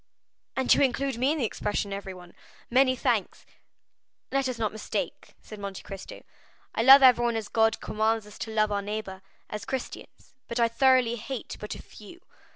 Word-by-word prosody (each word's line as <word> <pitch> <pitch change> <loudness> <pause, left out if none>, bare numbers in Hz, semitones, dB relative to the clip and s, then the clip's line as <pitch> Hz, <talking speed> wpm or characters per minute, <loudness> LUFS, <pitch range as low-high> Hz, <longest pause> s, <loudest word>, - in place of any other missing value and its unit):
"And 265 -1 +4
you - - +2
include 270 -1 0
me 265 +3 +2
in 315 - -1
the 265 - 0
expression 205 -1 -2
everyone—many 200 +7 -2
thanks!" 240 -6 -1 0.9
"Let 275 -1 +1
us 250 - -4
not 220 -2 -1
mistake," 220 - -5
said 215 - -10
Monte 200 -1 -6
Cristo; 195 -1 -9 0.5
"I - - 0
love 270 +3 +9
everyone 240 -2 +5
as 220 -2 -3
God 225 0 +2
commands 220 0 0
us 210 - -14
to - - -5
love 215 -1 +1
our 200 0 0
neighbor, 205 -2 -5 0.3
as 210 -1 -6
Christians; 265 -2 -7
but 235 - -3
I 235 - +4
thoroughly 255 -1 +3
hate 240 +2 -6
but 210 - -6
a - - -11
few. 215 - -14
225 Hz, 170 wpm, -27 LUFS, 210-255 Hz, 0.9 s, love